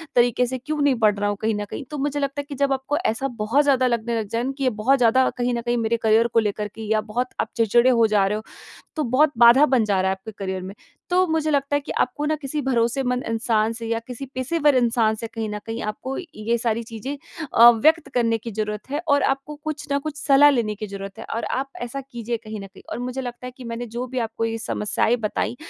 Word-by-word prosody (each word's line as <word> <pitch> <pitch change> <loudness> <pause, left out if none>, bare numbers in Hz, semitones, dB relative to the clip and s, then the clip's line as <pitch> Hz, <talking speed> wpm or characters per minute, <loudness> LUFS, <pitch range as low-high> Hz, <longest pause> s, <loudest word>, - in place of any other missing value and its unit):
तरीके 245 0 +3
से 260 +1 -3
क्यों 305 +5 -4
नहीं 280 -2 +3
पढ़ 210 -2 +3
रहा 205 - +1
हूँ 205 - -2
कहीं 220 0 +1
न 205 0 -3
कहीं। 270 - -7
तो 295 - -4
मुझे 290 +1 -1
लगता 280 0 -2
है 285 - -13
कि 280 - -5
जब 275 0 +1
आपको 270 +3 -2
ऐसा 225 +5 0
बहुत 240 +8 +3
ज़्यादा 265 -3 +3
लगने 235 -1 -1
लग 215 - -4
जाएँ 235 +4 -1
कि 275 - -3
ये 255 - +4
बहुत 270 +3 +5
ज़्यादा 250 +2 +4
कहीं 245 0 0
न 235 - -1
कहीं 240 0 0
मेरे 230 0 +1
करियर 220 +1 +4
को 230 - +5
लेकर 210 -1 -1
के 225 - -8
या 215 -1 +3
बहुत 230 +4 -2
आप - - -3
चिड़चिड़े 235 +3 +4
हो 230 -3 +4
जा 205 -2 +3
रहे 210 - 0
हो 215 - -7 0.5
तो 310 - 0
बहुत 280 +5 +3
बाधा 240 +5 +8
बन 255 -6 +3
जा 200 -3 +1
रहा 190 0 +1
है 190 - -1
आपके 190 +3 -10
करियर 190 -1 -3
में। 190 +2 -7 0.4
तो 370 +1 +4
मुझे 320 -2 0
लगता 285 -1 +1
है - - 0
कि 280 - -6
आपको 295 - 0
ना 310 - +1
किसी 295 +1 -4
भरोसेमंद 250 0 0
इंसान 225 -1 +1
से 230 0 -6
या 230 0 0
किसी 250 +2 -6
पेशेवर 285 +2 +2
इंसान 230 -3 +2
से 230 +1 -6
कहीं 225 -1 -5
न 210 - -4
कहीं 225 +1 -4
आपको 235 +5 -4 0.2
ये 225 +2 -1
सारी 230 0 -1
चीज़ें 230 +5 -6 0.4
अ, 235 +1 +10
व्यक्त 310 +8 +3
करने 230 -2 +2
की 230 +1 -7
जरूरत 210 +2 -4
है 290 - -1
और 285 0 +4
आपको 275 +2 -1
कुछ 310 -1 -4
ना 280 - +2
कुछ 300 +1 -6
सलाह 285 +1 +6
लेने 230 -6 0
की 215 +1 -6
जरूरत 195 0 -8
है - - -7
और 230 - -2 0.2
आप 275 - -5 0.2
ऐसा 275 +4 -5
कीजिए 235 0 -3
कहीं 215 -1 -6
न 195 - -7
कहीं। 195 - -17
और - - -4
मुझे 250 +2 -4
लगता 245 0 -6
है 250 - -7
कि 255 - -10
मैंने 235 +1 -5
जो 250 +1 -2
भी 255 +1 -4
आपको 225 +1 -3
ये 225 0 -2
समस्याएंँ 220 +1 0
बताई 230 +3 -2
240 Hz, 260 wpm, -23 LUFS, 220-270 Hz, 0.5 s, अ